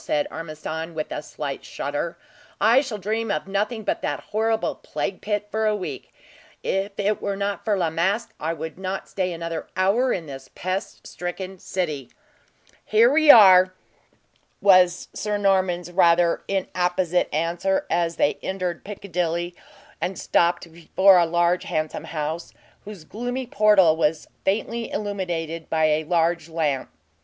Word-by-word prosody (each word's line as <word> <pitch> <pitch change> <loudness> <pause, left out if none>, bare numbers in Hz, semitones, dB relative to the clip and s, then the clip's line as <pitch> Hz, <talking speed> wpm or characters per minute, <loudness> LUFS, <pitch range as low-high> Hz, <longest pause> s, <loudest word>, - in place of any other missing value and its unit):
said 150 - 0
Ormiston, 160 +1 -6
with 155 - -4
a - - -3
slight 145 -2 -6
shudder. 145 +4 -4 0.4
"I 235 +5 +5
shall 245 -7 -5
dream 220 +3 -2
of 200 - -2
nothing 210 +3 -2
but - - -1
that - - -2
horrible 220 +1 0
plague 190 - -5
pit 210 0 -2
for 220 +1 0
a 215 - +2
week. 190 -3 -6 0.5
If 195 +1 -1
it 205 +1 0
were 200 -1 -2
not 200 0 -3
for 210 -3 +1
La 170 -4 0
Masque, 190 +8 0
I 160 +2 -1
would 160 +2 -6
not 190 0 -4
stay 185 -2 -2
another 165 -1 -5
hour 215 +7 +2
in 170 - -2
this 135 -2 -9
pest 185 +3 -4
stricken 185 +1 -6
city." 155 -10 -3 0.7
"Here 225 +3 +4
we 310 0 +4
are," 185 -6 +8 0.8
was 185 -3 +4
Sir 210 -1 -2
Norman's 185 -3 +1
rather 170 -1 +4
inapposite 180 -2 0
answer, 170 +5 0
as 170 -1 0
they 145 - +1
entered 185 -2 -3
Piccadilly, 175 -3 -3 0.5
and 190 - -2
stopped 170 0 +1
before 185 +3 +4
a 170 - +3
large 175 +1 +1
and - - -8
handsome 155 0 -2
house, 160 +1 -4 0.3
whose 205 -5 -9
gloomy 245 +8 -4
portal 210 -8 +4
was 160 -1 0 0.2
faintly 225 +4 -1
illuminated 175 -6 -4
by 160 -1 +2
a 155 0 +1
large 170 0 +1
lamp. 155 -5 -1
180 Hz, 150 wpm, -24 LUFS, 165-200 Hz, 0.8 s, are